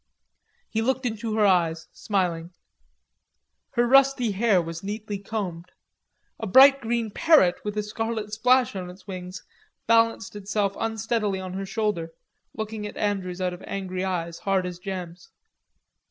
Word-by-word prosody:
He 220 - -1
looked 260 +2 0
into 225 -1 -2
her 215 -1 +3
eyes, 170 -4 +2
smiling. 175 -4 -2 1.2
Her 240 - +3
rusty 270 -2 +4
hair 200 -1 +3
was 165 0 -5
neatly 210 0 -4
combed. 190 -5 -4 0.7
A 220 - -4
bright 275 +7 +7
green 230 -1 -1
parrot 290 - +4
with 210 0 -4
a 210 - 0
scarlet 220 0 -4
splash 250 +1 +3
in 180 -2 -5
its 185 +2 -13
wings, 185 -1 -7 0.4
balanced 230 -1 +2
itself 200 0 -1
unsteadily 220 -2 -1
on 185 -1 -6
her 195 +1 -4
shoulder, 195 -6 -2 0.4
looking 220 -1 -4
at - - -10
Andrews 190 -3 -2
out 180 -1 0
of 180 - -10
angry 185 -1 -3
eyes, 170 -3 -3
hard 195 -2 0
as 180 -1 -6
gems. 180 -2 -7
205 Hz, 145 wpm, -25 LUFS, 185-225 Hz, 1.2 s, bright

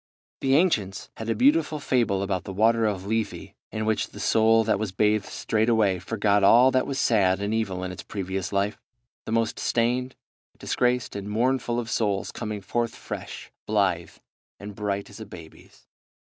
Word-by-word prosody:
The 135 0 +2
ancients 110 - +1
had 115 0 -5
a 115 - +1
beautiful 150 +5 +3
fable 115 -8 +1
about 95 -2 -2
the 95 - -6
water 110 +3 +3
of 95 -3 -3
Lethe, 110 0 -2 0.2
in 110 0 -3
which 110 -1 0
the 105 - -12
soul 110 +2 +4
that 110 -2 +1
was 110 -3 -2
bathed 105 +1 +1
straightway 110 -4 +1
forgot 100 +1 +1
all 120 +6 +7
that 130 0 +1
was 135 -1 -3
sad 95 -7 +3
and 100 +2 -2
evil 95 -5 -2
in 90 - -4
its 90 - -8
previous 95 -2 -4
life; 100 +1 -1 0.5
the - - -4
most 115 -1 0
stained, 125 +2 0 0.4
disgraced, 125 -2 0
and 100 0 -5
mournful 120 +2 0
of 120 - -4
souls 105 -3 -1
coming 105 -1 -5
forth 120 +4 -2
fresh, - - -8 0.2
blithe, 95 -6 0 0.4
and 105 +1 -8
bright 100 -1 -3
as 100 - -12
a 110 - -7
baby's. 80 -5 -14
110 Hz, 170 wpm, -25 LUFS, 100-115 Hz, 0.5 s, all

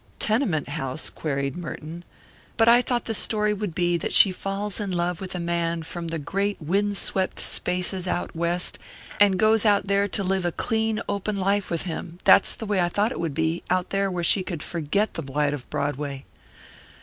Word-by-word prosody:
"Tenement 210 - 0
house?" 140 -1 -3
queried 140 -2 -3
Merton. 170 0 -7 0.5
"But 225 -1 +4
I 240 +1 +7
thought 245 -1 -1
the 225 - -2
story 210 -1 +1
would 205 -5 -4
be 175 -1 +2
that - - -2
she 195 - +8
falls 195 +2 -4
in 205 -2 -3
love 175 0 -1
with 185 -1 -5
a - - -2
man 170 -1 -1
from 170 +1 -6
the 165 0 -2
great 195 +7 -2
wind 200 +6 0
swept 190 -1 0
spaces 180 +1 0
out 175 - -2
West, 170 +2 -1 0.4
and 200 -2 +5
goes 215 +1 +4
out 205 -3 +3
there 200 +1 +2
to 200 0 -1
live 190 0 0
a 175 - 0
clean 220 +2 -1
open 200 +1 -2
life 195 +1 0
with 170 -2 -1
him 170 -1 -6
that's - - +5
the 225 - -6
way 205 -2 0
I 175 -1 +2
thought 205 +6 +1
it - - -5
would 165 -4 -2
be 160 +1 0
out 185 0 0
there 195 0 +1
where 180 -2 -3
she 190 - +4
could 175 -4 -5
forget 175 +6 -1
the - - -4
blight 145 +1 -1
of 135 -4 -7
Broadway." 140 -1 -3
180 Hz, 200 wpm, -25 LUFS, 165-205 Hz, 0.5 s, she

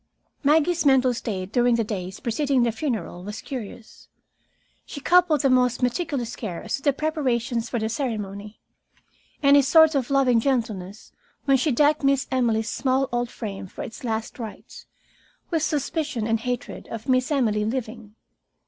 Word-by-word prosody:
Maggie's 320 +4 +3
mental 265 -3 +4
state 195 -5 -4
during 245 -1 +3
the 230 - +1
days 190 -3 -5
preceding 270 +1 +1
the 235 - +2
funeral 220 - -4
was 210 +2 -6
curious. 235 -3 -8 0.8
She 285 - -8
coupled 340 0 +4
the 275 - +3
most 250 -1 +2
meticulous 255 -2 -1
care 185 -7 -6
as - - -2
to - - -12
the 285 - +3
preparations 260 -6 -1
for 240 - -2
the 220 -1 -1
ceremony, 210 -4 -4 0.8
and 280 0 +6
a 285 - +7
sort 320 +3 +6
of 270 -4 -1
loving 265 -4 +3
gentleness 220 -6 -2 0.3
when 275 -2 +4
she 290 +4 +1
decked 290 +4 +3
Miss 275 0 +2
Emily's 230 -4 +1
small 265 +2 0
old 240 0 -1
frame 200 -6 -6
for - - -8
its 225 - -9
last 225 0 -3
rites, 225 -3 -9 0.6
with 325 -2 +1
suspicion 295 -5 -1
and 225 0 +1
hatred 245 +1 -5
of 230 +2 -7
Miss 255 +2 +2
Emily 220 -7 +1
living. 225 -2 -4
245 Hz, 160 wpm, -24 LUFS, 220-275 Hz, 0.8 s, a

